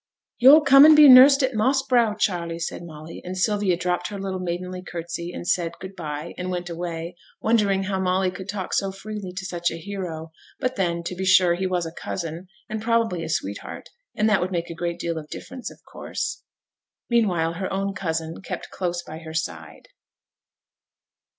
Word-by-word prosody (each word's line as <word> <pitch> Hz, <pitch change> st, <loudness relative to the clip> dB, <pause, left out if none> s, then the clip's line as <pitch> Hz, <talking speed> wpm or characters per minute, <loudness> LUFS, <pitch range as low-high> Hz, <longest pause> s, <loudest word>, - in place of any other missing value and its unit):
'Yo'll 275 Hz, +6 st, +9 dB
come 275 Hz, -1 st, +8 dB
and 310 Hz, 0 st, +9 dB
be 300 Hz, -1 st, +9 dB
nursed 270 Hz, +2 st, +9 dB
at 260 Hz, 0 st, +1 dB
Moss 265 Hz, +5 st, +1 dB
Brow, 235 Hz, -4 st, +3 dB
Charley,' 175 Hz, -5 st, -1 dB
said 170 Hz, -, -4 dB
Molly; 160 Hz, -1 st, -10 dB
and 185 Hz, +1 st, -6 dB
Sylvia 200 Hz, -2 st, +1 dB
dropped 180 Hz, 0 st, -1 dB
her 205 Hz, -, -6 dB
little 195 Hz, -1 st, -4 dB
maidenly 180 Hz, +1 st, -4 dB
curtsey, 170 Hz, -1 st, -6 dB
and 175 Hz, -, -7 dB
said, 170 Hz, -1 st, +1 dB
'Good 190 Hz, +1 st, -9 dB
by;' 155 Hz, -1 st, -6 dB
and 180 Hz, 0 st, -3 dB
went 175 Hz, -1 st, -4 dB
away, 170 Hz, 0 st, -5 dB, 0.2 s
wondering 205 Hz, -4 st, +2 dB
how 190 Hz, 0 st, -2 dB
Molly 185 Hz, 0 st, +1 dB
could 185 Hz, +1 st, -9 dB
talk 195 Hz, -2 st, -4 dB
so 195 Hz, -1 st, 0 dB
freely 200 Hz, -1 st, -7 dB
to 185 Hz, +1 st, -6 dB
such 175 Hz, -2 st, -1 dB
a -, -, -6 dB
hero; 165 Hz, -3 st, -6 dB, 0.3 s
but 255 Hz, 0 st, -1 dB
then, 170 Hz, -3 st, -1 dB
to 170 Hz, -, -4 dB
be 185 Hz, +1 st, -5 dB
sure, 185 Hz, -2 st, +5 dB
he 185 Hz, +2 st, -1 dB
was 180 Hz, -2 st, -1 dB
a 165 Hz, -, -5 dB
cousin, 170 Hz, +1 st, -6 dB, 0.2 s
and 220 Hz, 0 st, -4 dB
probably 225 Hz, -6 st, +1 dB
a 160 Hz, -, -5 dB
sweetheart, 100 Hz, -, -4 dB, 0.3 s
and 215 Hz, -, +2 dB
that 210 Hz, -2 st, +3 dB
would 180 Hz, +1 st, -2 dB
make 170 Hz, -2 st, -3 dB
a -, -, -4 dB
great 170 Hz, 0 st, -3 dB
deal 170 Hz, -1 st, -2 dB
of 150 Hz, -1 st, -12 dB
difference, 260 Hz, -1 st, -7 dB
of -, -, -16 dB
course. -, -, -5 dB, 0.7 s
Meanwhile 180 Hz, -9 st, +1 dB
her 185 Hz, +3 st, -4 dB
own 195 Hz, +1 st, -1 dB
cousin 165 Hz, -3 st, -3 dB
kept -, -, -6 dB
close 175 Hz, -1 st, -3 dB
by 160 Hz, -1 st, -9 dB
her 160 Hz, -1 st, -9 dB
side. 160 Hz, -, -5 dB
185 Hz, 195 wpm, -24 LUFS, 170-205 Hz, 0.7 s, Yo'll